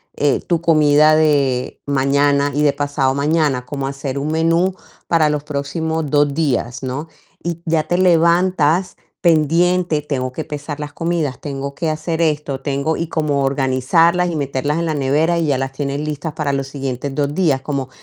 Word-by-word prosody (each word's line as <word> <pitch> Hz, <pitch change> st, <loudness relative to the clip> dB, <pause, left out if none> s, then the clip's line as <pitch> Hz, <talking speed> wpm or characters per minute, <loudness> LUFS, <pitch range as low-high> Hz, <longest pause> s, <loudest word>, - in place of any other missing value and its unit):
eh, 145 Hz, -2 st, +1 dB
tu 170 Hz, -2 st, -1 dB
comida 155 Hz, -2 st, +5 dB
de 140 Hz, -5 st, +1 dB
mañana 140 Hz, +1 st, +2 dB
y 145 Hz, -, 0 dB
de 145 Hz, -1 st, +3 dB
pasado 145 Hz, -2 st, 0 dB
mañana, 145 Hz, -3 st, +1 dB
como 135 Hz, +1 st, -4 dB
hacer 140 Hz, 0 st, -4 dB
un 140 Hz, -, -3 dB
menú 165 Hz, +3 st, +2 dB, 0.3 s
para 160 Hz, -3 st, +3 dB
los 150 Hz, -1 st, -2 dB
próximos 155 Hz, +2 st, -3 dB
2 145 Hz, 0 st, +2 dB
días, 135 Hz, -5 st, -1 dB
¿no?, 135 Hz, +5 st, -4 dB, 0.4 s
y 170 Hz, -1 st, -4 dB
ya 160 Hz, -2 st, +1 dB
te 175 Hz, -, 0 dB
levantas 175 Hz, -1 st, +2 dB, 0.2 s
pendiente: 170 Hz, 0 st, +2 dB
"Tengo 130 Hz, -3 st, -3 dB
que 160 Hz, -, -5 dB
pesar 150 Hz, -1 st, -6 dB
las 145 Hz, -1 st, -6 dB
comidas, 165 Hz, -5 st, -2 dB
tengo 140 Hz, -1 st, -5 dB
que 165 Hz, -2 st, -2 dB
hacer 160 Hz, +2 st, -2 dB
esto, 150 Hz, -4 st, -1 dB
tengo", 140 Hz, +2 st, -1 dB
y 165 Hz, -, -2 dB
como 150 Hz, -3 st, 0 dB
organizarlas 140 Hz, +6 st, +2 dB
y 170 Hz, -, -3 dB
meterlas 145 Hz, +1 st, -1 dB
en 170 Hz, -, -1 dB
la 160 Hz, -, 0 dB
nevera, 150 Hz, +5 st, +1 dB
y 165 Hz, -, 0 dB
ya 140 Hz, -3 st, +1 dB
las 135 Hz, 0 st, -3 dB
tienes 140 Hz, 0 st, -3 dB
listas 150 Hz, +1 st, -4 dB
para 145 Hz, -2 st, -2 dB
los 135 Hz, -1 st, -2 dB
siguientes 135 Hz, -1 st, -4 dB
2 145 Hz, -1 st, -1 dB
días, 150 Hz, -6 st, +1 dB
como 135 Hz, -2 st, -3 dB
150 Hz, 175 wpm, -18 LUFS, 140-160 Hz, 0.4 s, comida